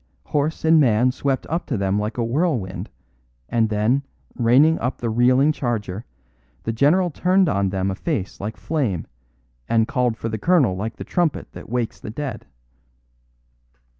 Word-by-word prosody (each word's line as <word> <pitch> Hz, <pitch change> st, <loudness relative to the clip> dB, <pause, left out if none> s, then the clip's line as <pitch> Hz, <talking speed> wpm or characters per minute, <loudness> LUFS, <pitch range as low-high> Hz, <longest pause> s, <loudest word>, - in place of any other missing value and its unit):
Horse 150 Hz, +2 st, -1 dB
and 160 Hz, 0 st, +6 dB
man 125 Hz, -2 st, +4 dB
swept 135 Hz, +1 st, -1 dB
up 165 Hz, +3 st, -3 dB
to 125 Hz, -, -1 dB
them 100 Hz, +1 st, 0 dB
like 105 Hz, +3 st, -3 dB
a 120 Hz, -, +1 dB
whirlwind; 120 Hz, -, -1 dB, 0.6 s
and 115 Hz, -2 st, +1 dB
then, 110 Hz, +6 st, +2 dB, 0.3 s
reining 135 Hz, +7 st, +4 dB
up 125 Hz, +2 st, -2 dB
the 115 Hz, -2 st, -2 dB
reeling 125 Hz, +5 st, +4 dB
charger, 115 Hz, -7 st, -3 dB, 0.6 s
the 115 Hz, -, -2 dB
general 165 Hz, +9 st, +3 dB
turned 185 Hz, +4 st, +2 dB
on 100 Hz, -6 st, +1 dB
them 95 Hz, 0 st, -1 dB
a -, -, -3 dB
face 110 Hz, -, -3 dB
like 105 Hz, +2 st, -4 dB
flame, 125 Hz, -, -1 dB, 0.6 s
and 115 Hz, -1 st, +3 dB
called 125 Hz, -3 st, 0 dB
for 115 Hz, -, -4 dB
the 110 Hz, -1 st, -3 dB
colonel 145 Hz, -, +3 dB
like 110 Hz, +4 st, -4 dB
the -, -, -7 dB
trumpet 175 Hz, -5 st, -1 dB
that -, -, -11 dB
wakes 120 Hz, -1 st, -2 dB
the -, -, -8 dB
dead. 125 Hz, -, -5 dB
120 Hz, 165 wpm, -22 LUFS, 110-150 Hz, 0.6 s, and